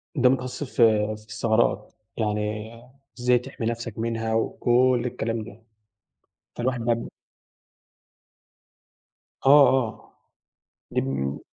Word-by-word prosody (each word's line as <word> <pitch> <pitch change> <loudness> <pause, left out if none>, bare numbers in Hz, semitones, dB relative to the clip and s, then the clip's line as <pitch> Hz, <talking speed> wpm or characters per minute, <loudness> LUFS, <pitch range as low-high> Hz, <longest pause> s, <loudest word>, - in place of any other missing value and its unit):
ده 125 -3 +4
متخصص 130 +2 -2
في 110 -5 +3
في 105 - -17
الثغرات 110 -1 0 0.2
يعني 105 0 -2 0.5
إزاي 125 0 +3
تحمي 120 -1 -7
نفسك 115 -1 -4
منها 115 -1 -2
وكلّ 120 +2 +2
الكلام 115 -2 -3
ده 110 0 -13 0.9
فالواحد 125 0 -1
بقي 115 0 -1 2.4
آه 140 -1 +8
آه. 125 -5 -2 0.7
دي - - +1
بم 70 +1 -3
115 Hz, 100 wpm, -25 LUFS, 110-125 Hz, 2.4 s, آه